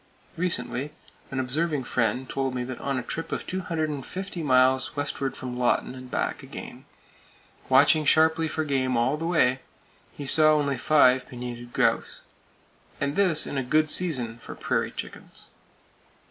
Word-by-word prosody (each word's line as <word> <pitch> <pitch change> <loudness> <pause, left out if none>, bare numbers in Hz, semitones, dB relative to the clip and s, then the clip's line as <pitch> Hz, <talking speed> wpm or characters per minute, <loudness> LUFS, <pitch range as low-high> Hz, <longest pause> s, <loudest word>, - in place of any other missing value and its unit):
Recently, 150 -5 -2 0.4
an 135 - -3
observing 145 +3 -1
friend 120 +1 -1
told 135 -1 -2
me 125 - -2
that 125 0 -7
on 140 -1 -2
a 125 - -3
trip 165 +6 -5
of - - -3
250 170 +1 -4
miles 130 -1 +3
westward 140 -1 -3
from 125 -1 -6
Lawton 120 0 +1
and 130 -1 -10
back - - -2
again, - - -10 0.8
watching 140 +4 +5
sharply 160 +2 +3
for 160 +1 -2
game 130 -4 0
all 120 +5 +2
the 165 +2 -4
way, 130 -7 +2 0.6
he 145 - -6
saw 155 +2 +6
only 140 -2 0
five 130 -3 +3
pinnated 120 -1 -7
grouse! - - 0 0.8
And 140 +1 -1
this 180 -6 +3
in 140 - -3
a - - -2
good 155 +4 +2
season 125 -10 0
for - - -9
"prairie - - -1
chickens." - - -10
140 Hz, 150 wpm, -26 LUFS, 130-155 Hz, 0.8 s, saw